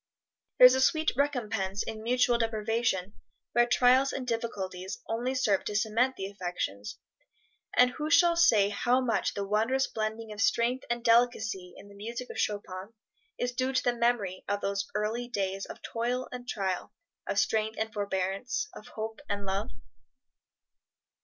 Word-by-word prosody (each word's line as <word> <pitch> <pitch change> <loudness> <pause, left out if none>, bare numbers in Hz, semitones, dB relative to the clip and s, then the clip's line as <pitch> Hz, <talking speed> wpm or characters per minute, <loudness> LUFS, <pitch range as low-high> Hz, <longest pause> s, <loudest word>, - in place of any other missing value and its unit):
There 250 - +10
is 250 - +9
a 260 - +2
sweet 315 +3 +3
recompense 220 -8 -1
in 215 -1 -6
mutual 245 +1 +2
deprivation 225 -3 0 0.4
where 240 +1 +4
trials 255 +2 +4
and 260 - -4
difficulties 195 -6 -4
only 245 +4 -1
serve 210 -7 +2
to 210 - -3
cement 230 +5 +2
the 190 - -4
affections; 175 - -4 0.8
and 250 0 +6
who 305 +3 -4
shall 340 +1 +5
say 220 -12 +5
how 245 +5 +2
much 245 -4 0
the 200 - -2
wondrous 225 +7 +1
blending 220 0 -4
of 210 -1 -5
strength 240 +5 +1
and 240 0 -1
delicacy 225 -6 +2
in - - -13
the 200 - -14
music 230 +5 -6
of - - -7
Chopin 205 0 -3 0.4
is 245 - -1
due 255 +2 -1
to 255 - +1
the 245 - +1
memory 235 -6 0
of 205 0 -1
those 200 0 -1
early 220 +3 -1
days 195 -4 -2
of - - -10
toil 245 +2 -2
and 245 0 -8
trial, 190 -3 -2 0.4
of - - -2
strength 220 +1 +1
and 220 0 -2
forbearance, 200 - -2
of 210 - -11
hope 220 +2 -6
and 200 -1 -2
love? 195 +4 -2
225 Hz, 160 wpm, -29 LUFS, 200-245 Hz, 0.8 s, There